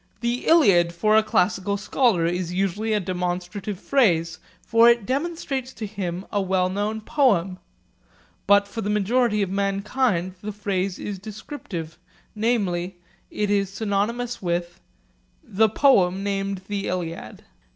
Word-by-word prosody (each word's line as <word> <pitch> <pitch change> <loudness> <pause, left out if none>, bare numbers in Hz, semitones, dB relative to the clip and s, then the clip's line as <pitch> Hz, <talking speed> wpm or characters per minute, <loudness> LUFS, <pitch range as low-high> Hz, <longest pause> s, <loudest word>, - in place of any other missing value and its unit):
'The 240 +1 -2
Iliad' 190 - +5
for 215 +5 +2
a 220 - +7
classical 200 -1 0
scholar 205 -4 +1
is 175 0 -1
usually 195 +4 -1
a 215 - +2
demonstrative 185 +2 -3
phrase; 170 -13 +1 0.2
for 230 +1 +5
it 235 -3 +2
demonstrates 270 - -3
to 220 - -6
him 190 -3 -5
a 205 - +1
well 185 -1 +1
known 205 +3 -2
poem. 200 - +1 0.9
But 200 0 +5
for 225 - -5
the 205 - -3
majority 210 +1 +2
of 190 - -3
mankind 200 -1 0
the 210 0 -5
phrase 195 -2 -2
is 200 -2 -5
descriptive, 190 - -8 0.3
namely, 190 -6 -1 0.3
it 210 -1 -2
is 200 -2 +1
synonymous 225 +4 -2
with 175 -1 -2 0.6
'The 220 +3 +2
poem 195 -7 +3
named 195 -1 -2
"the 205 -1 -3
Iliad".' 165 -10 -5
200 Hz, 135 wpm, -23 LUFS, 185-220 Hz, 0.9 s, a